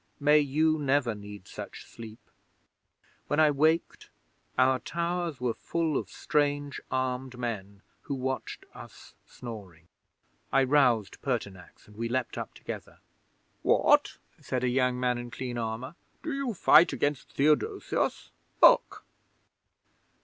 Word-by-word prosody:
May 150 Hz, +1 st, +5 dB
you 155 Hz, +2 st, +2 dB
never 140 Hz, -4 st, +1 dB
need 105 Hz, -1 st, -10 dB
such -, -, -9 dB
sleep! 110 Hz, -1 st, -12 dB, 1.0 s
When 145 Hz, -, 0 dB
I 155 Hz, -1 st, +6 dB
waked 155 Hz, +4 st, +1 dB, 0.5 s
our 130 Hz, 0 st, +4 dB
towers 170 Hz, 0 st, -3 dB
were 125 Hz, -2 st, 0 dB
full 165 Hz, +2 st, -2 dB
of -, -, -2 dB
strange, 145 Hz, -1 st, -1 dB
armed 130 Hz, 0 st, -2 dB
men, 100 Hz, -5 st, -5 dB, 0.2 s
who 140 Hz, -, -4 dB
watched 130 Hz, 0 st, -4 dB
us -, -, -13 dB
snoring. 95 Hz, -9 st, -10 dB, 0.6 s
I 135 Hz, -, +4 dB
roused 125 Hz, -6 st, +2 dB
Pertinax, 100 Hz, -9 st, -5 dB
and 105 Hz, -, -18 dB
we 115 Hz, +2 st, -3 dB
leaped 130 Hz, 0 st, -2 dB
up -, -, -6 dB
together. -, -, -8 dB, 0.6 s
'"What?" -, -, +3 dB, 0.2 s
said 125 Hz, -1 st, -3 dB
a 125 Hz, -, +2 dB
young 125 Hz, 0 st, +1 dB
man 125 Hz, -1 st, 0 dB
in 120 Hz, 0 st, -7 dB
clean 120 Hz, -1 st, -5 dB
armour. 115 Hz, +5 st, -4 dB, 0.3 s
"Do 320 Hz, -2 st, -3 dB
you 275 Hz, -5 st, -2 dB
fight 170 Hz, -1 st, +6 dB
against 145 Hz, -2 st, -2 dB
Theodosius? 155 Hz, -, 0 dB, 0.3 s
Look!" -, -, +5 dB
130 Hz, 130 wpm, -28 LUFS, 120-150 Hz, 1.0 s, I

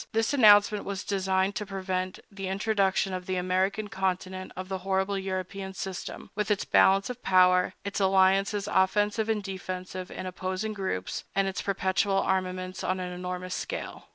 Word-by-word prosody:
This 225 Hz, +4 st, +1 dB
announcement 210 Hz, -5 st, +6 dB
was 200 Hz, 0 st, -4 dB
designed 190 Hz, 0 st, 0 dB
to 210 Hz, -, -3 dB
prevent 185 Hz, -1 st, -3 dB
the 195 Hz, -1 st, -5 dB
introduction 195 Hz, -1 st, +1 dB
on 185 Hz, -, -2 dB
the 185 Hz, +1 st, -3 dB
American 185 Hz, +3 st, 0 dB
continent 185 Hz, -2 st, -3 dB
of 185 Hz, 0 st, -5 dB
the 190 Hz, 0 st, -3 dB
horrible 190 Hz, +1 st, 0 dB
European 190 Hz, 0 st, -4 dB
system—with 195 Hz, +2 st, -5 dB
its 205 Hz, -2 st, +1 dB
balance 195 Hz, +4 st, +4 dB
of 250 Hz, 0 st, -9 dB
power, 180 Hz, -2 st, +4 dB
its 200 Hz, -, -2 dB
alliances 195 Hz, +1 st, +3 dB
offensive 210 Hz, +3 st, +2 dB
and 215 Hz, -2 st, 0 dB
defensive 185 Hz, -1 st, -5 dB
in -, -, -6 dB
opposing 185 Hz, +3 st, -3 dB
groups, 190 Hz, -, -3 dB
and 195 Hz, 0 st, +2 dB
its 190 Hz, -, -3 dB
perpetual 195 Hz, 0 st, +1 dB
armaments 185 Hz, -1 st, -1 dB
on 185 Hz, 0 st, 0 dB
an 180 Hz, -1 st, -4 dB
enormous 180 Hz, 0 st, -5 dB
scale. -, -, -5 dB
190 Hz, 155 wpm, -28 LUFS, 185-200 Hz, -, announcement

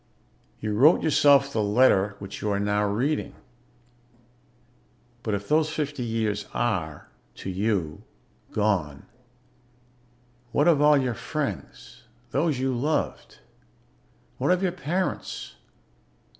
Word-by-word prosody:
You 105 Hz, -1 st, -3 dB
wrote 140 Hz, +10 st, +5 dB
yourself 140 Hz, -2 st, +4 dB
the 110 Hz, -, +1 dB
letter 105 Hz, -2 st, +3 dB
which 100 Hz, -1 st, -8 dB
you 105 Hz, -, -1 dB
are 100 Hz, -1 st, 0 dB
now 105 Hz, 0 st, +1 dB
reading. 130 Hz, +9 st, -1 dB, 1.9 s
But 110 Hz, -3 st, -1 dB
if 100 Hz, 0 st, -6 dB
those 155 Hz, +1 st, +2 dB
fifty 145 Hz, -3 st, -3 dB
years 110 Hz, -3 st, -2 dB
are 90 Hz, -11 st, -2 dB, 0.3 s
to 95 Hz, -, -6 dB
you 95 Hz, -5 st, -1 dB, 0.5 s
gone, 90 Hz, -10 st, -1 dB, 1.5 s
what 145 Hz, +6 st, +2 dB
of 160 Hz, -4 st, +4 dB
all 150 Hz, 0 st, +6 dB
your 130 Hz, -3 st, 0 dB
friends, -, -, -6 dB, 0.3 s
those 150 Hz, 0 st, +1 dB
you 130 Hz, 0 st, -1 dB
loved? 145 Hz, +6 st, -2 dB, 1.0 s
What 135 Hz, -, 0 dB
of 180 Hz, +1 st, +2 dB
your 185 Hz, -, +1 dB
parents? 180 Hz, +1 st, -3 dB
120 Hz, 115 wpm, -25 LUFS, 105-145 Hz, 1.9 s, all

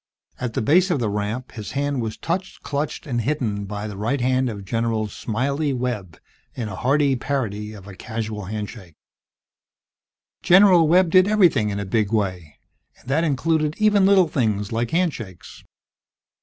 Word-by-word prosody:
At 125 Hz, -2 st, -3 dB
the -, -, 0 dB
base 180 Hz, -, +4 dB
of 170 Hz, -6 st, +1 dB
the 110 Hz, -4 st, -1 dB
ramp 105 Hz, +5 st, -3 dB
his 110 Hz, -2 st, -7 dB
hand 140 Hz, -1 st, -1 dB
was 110 Hz, -1 st, -4 dB
touched, 180 Hz, +3 st, -4 dB
clutched 145 Hz, +1 st, -3 dB
and 120 Hz, -4 st, -1 dB
hidden 115 Hz, -7 st, -2 dB
by 105 Hz, +1 st, -5 dB
the 105 Hz, -2 st, -6 dB
right 115 Hz, +7 st, -1 dB
hand 130 Hz, +1 st, +1 dB
of 100 Hz, -3 st, -7 dB
General 115 Hz, 0 st, -1 dB
"Smiley" 140 Hz, +8 st, -2 dB
Webb 120 Hz, -9 st, -4 dB, 0.4 s
in 115 Hz, -3 st, -4 dB
a 105 Hz, -, -6 dB
hearty 140 Hz, +1 st, +2 dB
parody 110 Hz, -6 st, -3 dB
of 100 Hz, -2 st, -12 dB
a 100 Hz, -, -9 dB
casual 110 Hz, -1 st, -5 dB
handshake. 105 Hz, -4 st, -7 dB, 1.5 s
General 180 Hz, -3 st, +6 dB
Webb 175 Hz, +1 st, +4 dB
did 185 Hz, +1 st, +6 dB
everything 180 Hz, -, +3 dB
in 100 Hz, 0 st, -3 dB
a 100 Hz, -, -3 dB
big 105 Hz, +1 st, 0 dB
way, 90 Hz, -8 st, -2 dB, 0.4 s
and 125 Hz, -, -15 dB
that 155 Hz, +5 st, +2 dB
included 155 Hz, +1 st, 0 dB
even 205 Hz, -3 st, +4 dB
little 195 Hz, -3 st, +5 dB
things 105 Hz, -8 st, -1 dB
like 115 Hz, +1 st, -1 dB
handshakes. 130 Hz, -, -3 dB
120 Hz, 165 wpm, -22 LUFS, 105-150 Hz, 1.5 s, General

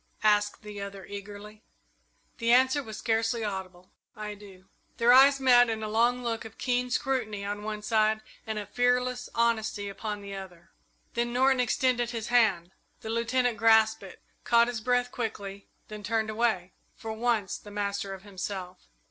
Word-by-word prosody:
asked 210 Hz, 0 st, +2 dB
the 210 Hz, -1 st, -7 dB
other, 200 Hz, -1 st, -7 dB
eagerly. 205 Hz, +1 st, -9 dB, 0.8 s
The 230 Hz, 0 st, +2 dB
answer 260 Hz, +3 st, +4 dB
was 220 Hz, -5 st, -8 dB
scarcely 225 Hz, 0 st, 0 dB
audible. 185 Hz, -3 st, -6 dB, 0.2 s
"I 210 Hz, 0 st, -5 dB
do." 195 Hz, -2 st, -14 dB, 0.3 s
Their 235 Hz, +1 st, +5 dB
eyes 275 Hz, +2 st, +7 dB
met 245 Hz, -2 st, +6 dB
in 220 Hz, -1 st, -3 dB
a -, -, -2 dB
long 240 Hz, +3 st, +2 dB
look 230 Hz, -1 st, -2 dB
of 220 Hz, -1 st, -11 dB
keen 250 Hz, 0 st, 0 dB
scrutiny 235 Hz, -6 st, -1 dB
on 205 Hz, +1 st, -4 dB
one 210 Hz, 0 st, -5 dB
side, 215 Hz, 0 st, +2 dB, 0.3 s
and 220 Hz, -1 st, -3 dB
of 205 Hz, -1 st, -5 dB
fearless 250 Hz, 0 st, +1 dB
honesty 220 Hz, -3 st, 0 dB
upon 205 Hz, +1 st, -5 dB
the 200 Hz, 0 st, -7 dB
other. 185 Hz, -3 st, -10 dB, 0.4 s
Then 240 Hz, 0 st, -1 dB
Norton 260 Hz, +1 st, +3 dB
extended 245 Hz, 0 st, +1 dB
his 230 Hz, -1 st, -5 dB
hand. 200 Hz, -8 st, +3 dB, 0.3 s
The 220 Hz, -, -5 dB
Lieutenant 235 Hz, +1 st, +1 dB
grasped 220 Hz, -1 st, +5 dB
it, 190 Hz, -2 st, -11 dB, 0.2 s
caught 235 Hz, 0 st, +4 dB
his 240 Hz, -2 st, -4 dB
breath 245 Hz, +1 st, +1 dB
quickly, 200 Hz, -4 st, -5 dB, 0.2 s
then 215 Hz, -1 st, -8 dB
turned 220 Hz, +1 st, -1 dB
away, 215 Hz, -5 st, 0 dB, 0.2 s
for 225 Hz, -1 st, -6 dB
once 220 Hz, -3 st, -1 dB
the 205 Hz, -, -13 dB
master 200 Hz, -1 st, -3 dB
of 190 Hz, -, -14 dB
himself. 190 Hz, -2 st, -6 dB
220 Hz, 165 wpm, -28 LUFS, 205-240 Hz, 0.8 s, eyes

